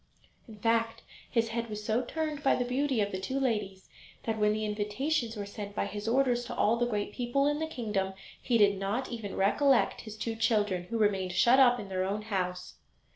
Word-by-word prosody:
In 220 -2 -11
fact 230 +1 0 0.3
his 230 -1 +1
head 235 0 -3
was 210 0 -6
so 220 +3 +1
turned 310 0 -3
by 275 - +3
the 245 - -1
beauty 260 -1 0
of 205 0 -1
the 185 - -3
two 260 +8 -2
ladies 210 -7 -2 0.4
that 225 -1 -2
when 210 0 +3
the 215 0 -1
invitations 225 +5 -1
were 205 - -4
sent 205 0 -7
by - - 0
his 205 +1 -6
orders 245 0 +2
to - - -6
all 220 - +3
the 240 +1 0
great 210 -3 -2
people 250 +3 0
in 295 +1 +1
the 320 - -1
kingdom, 210 -9 -2 0.3
he 240 -3 +2
did 200 -2 +4
not 210 +8 -2
even 225 -4 -5
recollect 260 +7 +3
his 215 -1 -9
two 225 +1 -3
children, 210 -5 +1
who 230 +5 -3
remained 195 -4 +1
shut 240 +8 +5
up 245 -2 +6
in 200 - -7
their 185 -1 -1
own 200 +3 -2
house! 180 -4 -3
225 Hz, 215 wpm, -30 LUFS, 205-245 Hz, 0.4 s, up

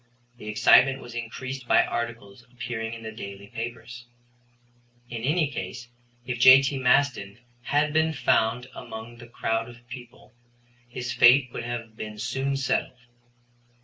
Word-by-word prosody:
The 105 - -11
excitement 135 +5 +5
was 120 -2 -11
increased 125 +2 -6
by - - +5
articles 115 -2 -5
appearing 115 -2 -5
in 115 - -11
the 110 - -6
daily 100 -2 -9
papers. 120 +2 -8 1.0
In 115 -2 -5
any 150 +3 +1
case, 115 +3 -6 0.4
if 125 -1 -4
J.T. 135 +2 +7
Maston 125 -5 +1 0.3
had 150 +1 +1
been 160 0 +2
found 125 -3 +1
among 115 0 -9
the 120 0 -12
crowd 115 0 -2
of 120 0 -16
people, 120 0 -12 0.6
his 125 0 -5
fate 125 +2 +5
would 115 - -5
have 115 -2 -6
been 105 -1 -7
soon 135 +5 -2
settled. 135 -1 -1
120 Hz, 140 wpm, -26 LUFS, 115-130 Hz, 1.0 s, J.T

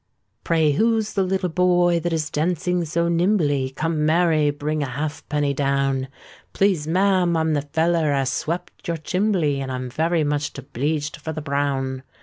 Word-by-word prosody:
"Pray, 160 -3 +2
who's 220 +6 +1
the 195 - +1
little 190 0 0
boy 175 0 +3
that 175 +1 -2
is 160 -1 -1
dancing 175 +3 0
so 170 +2 0
nimbly? 165 -6 +1
Come, 155 +3 -2
Mary, 155 -1 +3
bring 150 +1 -2
a 140 - -1
halfpenny 145 +1 -2
down.—" 135 -1 0 0.5
"Please, 185 -7 +1
ma'am, 185 -1 +2
I'm 160 -1 +1
the 145 - +1
feller 165 -1 +2
as 135 -2 +1
swept 175 +4 -4
your 170 -1 -1
chimbley, 175 -4 0
And 130 -1 -4
I'm 130 -1 -4
very 160 +4 +1
much 145 0 -1
obleeged 145 +3 -3
for 160 +1 -5
the 155 - -5
brown. 140 -2 -1
155 Hz, 160 wpm, -22 LUFS, 145-175 Hz, 0.5 s, boy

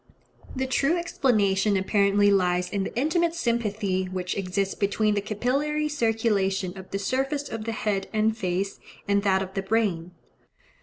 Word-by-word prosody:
The 260 0 -1
true 275 +5 +1
explanation 210 - +2
apparently 200 +1 +3
lies 180 -2 +1
in 200 -1 -1
the - - -6
intimate 330 +5 +1
sympathy 215 - -1
which 185 -1 -3
exists 195 0 -1
between 210 +1 +1
the 205 - 0
capillary 275 +9 -1
circulation 215 -8 0
of 190 -1 -10
the 195 - -2
surface 270 +7 -1
of 220 -1 -5
the 230 - -2
head 205 -3 -2
and 220 0 +1
face, 195 -1 -2 0.3
and 200 0 +2
that 190 -1 +2
of 190 0 -9
the 195 - -1
brain. 195 -5 0
205 Hz, 155 wpm, -26 LUFS, 190-235 Hz, 0.3 s, apparently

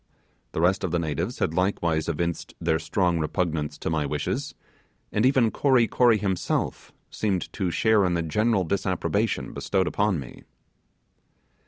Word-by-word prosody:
The 80 - -1
rest 95 +4 +2
of 95 - 0
the 85 - 0
natives 80 -4 -2
had - - 0
likewise 85 -3 0
evinced 85 +1 -3
their 80 -1 +1
strong 90 -4 0
repugnance 75 -2 -1
to - - -3
my 80 -2 +1
wishes, 130 - -3 0.6
and 105 +4 +3
even 130 -4 +3
Kory 130 -5 +3
Kory 120 -2 +4
himself 95 -4 -2 0.2
seemed 100 -4 -2
to 95 -4 -1
share 110 +3 +3
in 90 -1 +1
the 85 - 0
general 105 +5 +1
disapprobation 95 +3 -1
bestowed 95 -2 0
upon 100 -2 +1
me. 65 -3 -10
90 Hz, 150 wpm, -25 LUFS, 80-105 Hz, 0.6 s, Kory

